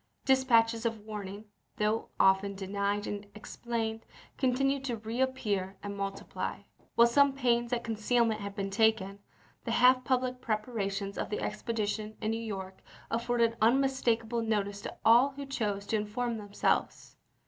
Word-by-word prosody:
Dis 265 Hz, -1 st, +4 dB
patches 230 Hz, -2 st, +3 dB
of 225 Hz, -1 st, -1 dB
warning, 205 Hz, -1 st, -6 dB, 0.3 s
though 215 Hz, +1 st, 0 dB
often 195 Hz, +1 st, +4 dB
denied 200 Hz, +1 st, -1 dB
and 205 Hz, 0 st, -5 dB
explained, 225 Hz, 0 st, -4 dB, 0.3 s
continued 270 Hz, +1 st, +1 dB
to 240 Hz, -3 st, -2 dB
reappear 220 Hz, -4 st, -2 dB
and 200 Hz, 0 st, -5 dB
multiply. 195 Hz, 0 st, -4 dB, 0.3 s
While 235 Hz, -, +7 dB
some 280 Hz, +3 st, +4 dB
pains 240 Hz, -3 st, +1 dB
at 240 Hz, -1 st, 0 dB
concealment 225 Hz, 0 st, +1 dB
had 200 Hz, 0 st, -6 dB
been 195 Hz, -1 st, -3 dB
taken, 205 Hz, -2 st, +2 dB, 0.4 s
the -, -, -5 dB
half 255 Hz, 0 st, +5 dB
public 255 Hz, 0 st, 0 dB
preparations 205 Hz, -3 st, -2 dB
of -, -, -2 dB
the 210 Hz, -, -2 dB
expedition 215 Hz, -1 st, -3 dB
in 215 Hz, -, -1 dB
New 225 Hz, 0 st, -2 dB
York 190 Hz, -4 st, -6 dB, 0.3 s
afforded 235 Hz, 0 st, +1 dB
unmistakable 235 Hz, -2 st, +2 dB
notice 205 Hz, -2 st, -1 dB
to -, -, -7 dB
all 245 Hz, +5 st, +6 dB
who 280 Hz, +1 st, -6 dB
chose 210 Hz, -7 st, -2 dB
to 220 Hz, -, 0 dB
inform 230 Hz, +3 st, -2 dB
themselves. 205 Hz, -1 st, -1 dB
225 Hz, 145 wpm, -30 LUFS, 205-240 Hz, 0.4 s, While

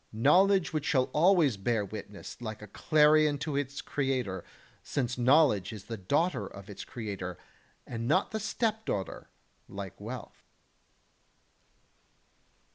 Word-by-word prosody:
knowledge 180 Hz, -, +4 dB
which 155 Hz, -2 st, -1 dB
shall 130 Hz, -3 st, +2 dB
always 160 Hz, -, +4 dB
bear 105 Hz, +1 st, 0 dB
witness 105 Hz, +2 st, -9 dB
like 110 Hz, -2 st, -6 dB
a -, -, -9 dB
clarion 150 Hz, -, +4 dB
to 150 Hz, 0 st, -3 dB
its 140 Hz, 0 st, -3 dB
creator, 130 Hz, -10 st, -2 dB, 0.4 s
since 125 Hz, -3 st, -2 dB
knowledge 125 Hz, -, +4 dB
is 105 Hz, -3 st, -8 dB
the 115 Hz, -, -5 dB
daughter 145 Hz, -, 0 dB
of 100 Hz, +1 st, -11 dB
its 100 Hz, 0 st, -7 dB
creator, 100 Hz, -7 st, -6 dB, 0.5 s
and 115 Hz, -1 st, -4 dB
not 185 Hz, +8 st, +2 dB
the 220 Hz, -, -2 dB
stepdaughter, 220 Hz, -, -2 dB, 0.4 s
like 100 Hz, 0 st, -8 dB
wealth. 120 Hz, +3 st, -8 dB
130 Hz, 120 wpm, -30 LUFS, 105-155 Hz, 0.5 s, knowledge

